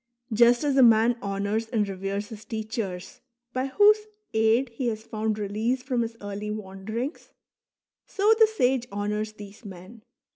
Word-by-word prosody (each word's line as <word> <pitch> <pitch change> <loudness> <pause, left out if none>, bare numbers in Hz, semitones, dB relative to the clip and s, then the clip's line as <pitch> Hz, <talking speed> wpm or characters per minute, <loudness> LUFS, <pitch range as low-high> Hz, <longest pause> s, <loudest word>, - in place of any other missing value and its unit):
Just 240 +3 +5
as 285 -2 +1
a - - +7
man 230 0 +6
honours 200 +3 -2
and 220 -4 0
reveres 195 +1 -4
his 220 -1 -9
teachers, 215 -4 -5 0.3
by 255 +1 -1
whose 420 +8 +4 0.3
aid 225 +4 +3
he 240 +2 -3
has 220 -1 -3
found 215 -1 -2
release 215 +5 -1
from 255 -2 0
his 230 0 -4
early 205 +1 -5
wanderings, 215 - -5 0.8
so 415 +2 +3
the 445 - +8
sage 260 - +1
honours 210 +1 -2
these 205 +1 -12
men. 195 +3 -11
220 Hz, 150 wpm, -26 LUFS, 205-245 Hz, 0.8 s, the